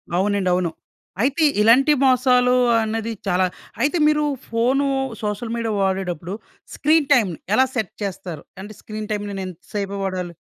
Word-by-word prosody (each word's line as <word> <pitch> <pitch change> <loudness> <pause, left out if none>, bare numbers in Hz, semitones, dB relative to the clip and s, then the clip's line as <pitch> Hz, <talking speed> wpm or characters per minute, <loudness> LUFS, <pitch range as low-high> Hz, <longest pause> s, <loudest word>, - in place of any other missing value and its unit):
అవునండి. 195 0 +1
అవును. 175 -3 0 0.5
అయితే 280 +5 +1 0.2
ఇలాంటి 255 +7 +5
మోసాలు 250 -1 +4 0.3
అన్నది 225 +1 -2 0.2
చాలా 185 0 +2 0.4
అయితే 295 +6 +2
మీరు 300 0 +2 0.2
ఫోను, 255 +5 +1 0.3
సోషల్ 210 +2 -3
మీడియా 230 -1 -2
వాడేటప్పుడు 190 -2 -2 0.4
స్క్రీన్ 305 -1 +2
టైమ్‌ని 200 - +2 0.2
ఎలా 260 +3 +5
సెట్ 220 -6 -2
చేస్తారు? 180 -5 -5 0.2
అంటే, 210 +2 -9
స్క్రీన్ 215 0 -6
టైమ్‌‌ని 205 -1 -3
నేను - - -3
ఇంత 180 -1 -10
సేపే 200 -1 -3
వాడాలి. 180 -2 -3
215 Hz, 145 wpm, -21 LUFS, 190-250 Hz, 0.5 s, ఇలాంటి